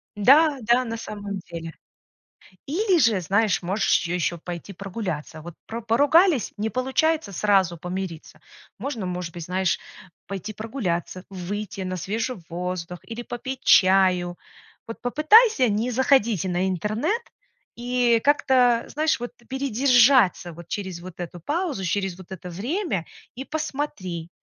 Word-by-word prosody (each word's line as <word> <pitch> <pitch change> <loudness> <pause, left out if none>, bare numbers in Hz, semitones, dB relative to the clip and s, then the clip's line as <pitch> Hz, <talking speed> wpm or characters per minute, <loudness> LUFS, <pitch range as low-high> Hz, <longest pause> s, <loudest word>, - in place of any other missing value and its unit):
Да, 280 +8 +5
да, 240 +3 +3
на 230 0 -4
самом 205 -2 -6
деле. 165 -1 -7 0.9
Или 365 +4 +2
же, 225 -8 +3
знаешь, 200 +3 +1
можешь 185 -1 +1
ещё 175 0 -1
пойти 175 +3 -7
прогуляться. 180 -6 -5
Вот 175 0 -9
про 230 +1 -5
поругались, 285 - +3
не 220 +2 -2
получается 265 -1 0
сразу 190 -3 +2
помириться. 180 -1 -6 0.4
Можно, 230 -4 -4
может 180 -2 -4
быть, 170 -2 -6
знаешь, 185 0 0 0.5
пойти 195 +2 -5
прогуляться, 195 -5 -4
выйти 195 +2 -5
на 185 0 -3
свежий 220 +7 -3
воздух 180 0 -4
или 230 +1 -6
попить 260 +2 -6
чаю. 185 -2 +4 0.5
Вот 230 - -8
попытайся 310 - +5
не 215 +4 0
заходить 235 - +2
на 185 +1 0
интернет 215 - -1 0.5
и 240 -1 +2
как-то, 255 -4 +3
знаешь, 310 -1 0
вот 245 - -5 0.2
передержаться, 255 -7 +3
вот, 170 +1 -12
через 190 -4 -4
вот 180 0 -10
эту 175 0 -6
паузу, 295 - -2
через 190 0 -1
вот 185 0 -13
это 180 -1 -8
время 225 - -2 0.3
и 265 +3 -6
посмотри, 270 - -4
210 Hz, 135 wpm, -24 LUFS, 180-255 Hz, 0.9 s, Да